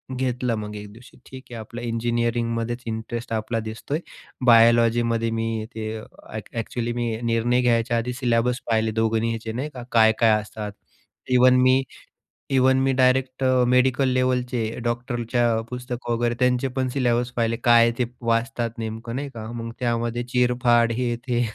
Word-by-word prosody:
घेतला 125 -2 -1
मग 105 0 -6
एक 105 0 -8
दिवशी, 120 +3 -16
ठीक 130 0 -11
आहे. - - -6
आपलं 115 +2 -8
इंजिनिअरिंगमध्येच 115 0 -1
इंटरेस्ट 115 +1 -4
आपला 110 +1 -1
दिसतोय. 110 +7 -4 0.5
बायोलॉजीमध्ये 115 0 +4
मी 115 -1 -2
ते 110 0 -4
अ, 110 - -9 0.3
अ‍ॅक्चुअली 115 +2 -4
मी 120 -2 -2
निर्णय 115 +2 +1
घ्यायच्या 120 -1 +2
आधी 125 +2 -2
सिलेबस 120 0 0
पाहिले 110 0 +1
दोघांचे 115 0 -1
नाही 135 +5 -3
का? 125 - -6
काय-काय 110 0 +5
असतात. 105 0 -7 0.6
इव्हन 125 0 +6
मी 130 +1 +4 0.7
इव्हन 130 0 +4
मी 135 - +2
डायरेक्ट 130 0 +2
अ, 130 -1 +3
मेडिकल 130 +1 +3
लेव्हलचे 125 -1 0 0.2
डॉक्टरच्या 120 -1 0
पुस्तक 125 -1 -6
वगैरे 120 0 0
त्यांचे 125 +1 +2
पण 130 -1 0
सिलेबस 125 -2 0
पाहिले. 115 -1 +1
काय 115 -1 +6
ते 125 - +2 0.2
वाचतात 115 0 -1
नेमकं 115 +2 -5
नाही 140 +1 -3
का? 110 +1 -6
मग 115 -1 -5
त्यामध्ये 120 0 -1
चिरफाड 120 -1 +3
हे 120 -2 0
ते. 120 -1 +1
120 Hz, 150 wpm, -23 LUFS, 115-125 Hz, 0.7 s, इव्हन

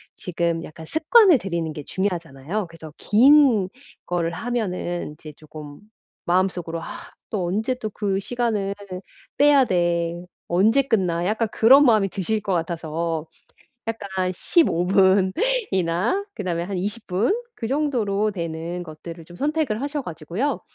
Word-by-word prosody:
지금 170 -2 -2
약간 160 0 -10
습관을 335 - +5
들이는 170 -7 -3
게 150 - -7
중요하잖아요. 175 0 -3
그래서 165 -2 -11
긴 245 -4 +5 0.4
걸 170 -1 -1
하면은 180 -6 -3
이제 150 0 -12
조금 150 -1 -11 0.5
마음 185 +2 +3
속으로 165 -2 -5
'아 - - -8 0.4
또 195 -5 -2
언제 220 +8 -1
또 225 -4 -5
그 200 -2 -1
시간을 215 -3 -1 0.6
빼야 285 -2 +6
돼.' 175 -2 0 0.2
'언제 210 +10 +4
끝나.' 185 -10 0
약간 220 +2 0
그런 270 +6 +6
마음이 215 -5 +4
드실 200 +4 -1
것 195 - -2
같아서 165 -1 -2 0.6
약간 190 -4 -2
15 180 - +2
분이나 190 - +2
그 - - -6
다음에 170 -2 -1
한 190 +1 -4
20 210 +4 -4
분 195 - +1 0.2
그 230 - -4
정도로 230 -7 0
되는 170 -1 -4
것들을 165 +1 -10
좀 175 - -13
선택을 285 - -1
하셔 290 +1 -2
가지고요. 175 - -3
190 Hz, 270 characters per minute, -23 LUFS, 170-230 Hz, 0.6 s, 빼야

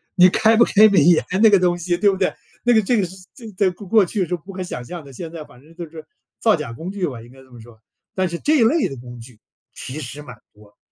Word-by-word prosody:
你 180 -1 +7
开 220 +4 +3
不 235 - +6
开 215 +1 +5
美 200 - +4
颜 170 +2 +4 0.2
那 220 - +7
个 200 - +5
东 175 -1 +1
西 175 0 -2
对 200 +3 +3
不 190 - -1
对？ 185 - 0 0.3
那 240 0 +3
个 220 - +4
这 225 +2 +1
个 185 - 0
是 185 - -11 0.2
在 240 - -13
在 200 -3 +3
过 185 +2 -11
过 210 -1 +4
去 185 0 -2
是 180 - -2
不 175 +4 -12
可 185 0 -7
想 125 -9 -6
象 170 +4 -8
的， 140 - -13
现 165 +4 -8
在 160 -3 -8
反 125 - -19
正 160 +3 -19
就 170 -1 -7
是 160 -1 -11 0.4
造 220 -5 +3
假 140 -7 -6
工 165 +9 -7
具 195 -3 -2
吧， 125 -6 -7
应 120 +2 -15
该 135 - -17
这 130 - -21
么 120 -2 -13
说。 110 -1 -17 0.4
但 185 -1 0
是 170 0 -5
这 305 - +1
一 245 - +4
类 290 +8 +2
的 135 - -8
工 120 0 -11
具 115 -2 -13 0.3
其 145 +5 -7
实 145 +2 -7
蛮 125 -5 -12 0.2
多， 105 -1 -21
175 Hz, 315 characters per minute, -20 LUFS, 135-200 Hz, 0.4 s, 你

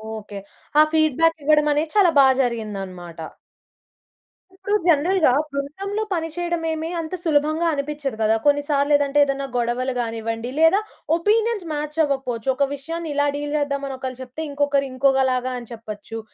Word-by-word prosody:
Okay. 205 -2 -8 0.4
ఆ - - +10
feedback 320 +1 +3
ఇవ్వడం 300 +1 +4
అనేది 305 +2 -1
చాలా 385 -5 +5
బా 270 - +7
జరిగిందన్నమాట. 195 -8 -4 1.4
ఇప్పుడు 400 +2 -1
జనరల్‌గా 330 0 +4 0.2
బృందంలో 385 +10 -3
పనిచేయడం 340 0 -2
ఏమి 320 +1 -3
అంత 320 +1 -5
సులభంగా 310 +1 +1
అనిపించదు 280 -3 -3
గదా! 220 0 +3
కొన్ని 290 0 +3
సార్లు 285 0 +2
ఏదంటే 285 0 +1
ఏదైనా 275 0 -2
గొడవలు 245 +2 -1
గానివ్వండి 230 0 -3
లేదా 325 +5 +5 0.4
ఒపీనియన్స్ 430 +2 +1
మ్యాచ్ 300 +1 -4
అవ్వకపోవచ్చు. 265 -4 -2
ఒక 280 - +1
విషయాన్ని 325 +3 -5
ఇలా 285 0 +2
డీల్ 290 0 -4
చేద్దాం 280 -1 -1
అని 270 - -5
ఒకళ్ళు 260 -1 -6
చెప్తే 260 +4 -7
ఇంకొకరు 280 -1 +1
ఇంకొకలాగా 260 -1 +2
అని 235 - -12
చెప్పొచ్చు. 225 0 -8
285 Hz, 145 wpm, -22 LUFS, 255-320 Hz, 1.4 s, ఆ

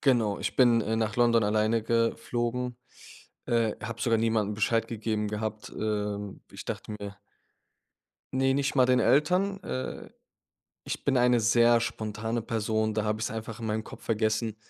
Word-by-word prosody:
Genau, 115 -7 +2
ich - - -3
bin, 120 -3 +5
äh, 110 +1 -1
nach 110 -1 -1
London 120 -1 +4
alleine 110 +2 +2
geflogen, 120 +2 -1 0.7
äh, 115 -2 +1
habe 115 -1 -6
sogar 115 0 +2
niemandem 110 -2 +1
Bescheid 115 +2 +1
gegeben 110 -2 -2
gehabt. 105 0 -4
Ähm, 105 -2 -3
ich - - -9
dachte 105 - -5
mir 100 -1 -7 1.2
Ne, 135 0 +2
nicht 140 0 0
mal 130 -2 +5
den 125 0 +4
Eltern. 180 - +2
Äh, 130 -6 -5 0.7
ich - - -5
bin 135 -2 +2
eine 125 0 +4
sehr 115 +1 +5
spontane 110 0 -3
Person, 110 -1 -1
da 110 0 0
habe 105 0 -1
ich's - - -2
einfach 110 0 -6
in 115 - -5
meinem 110 0 -1
Kopf - - -12
vergessen. 110 0 0
115 Hz, 160 wpm, -28 LUFS, 110-120 Hz, 1.2 s, bin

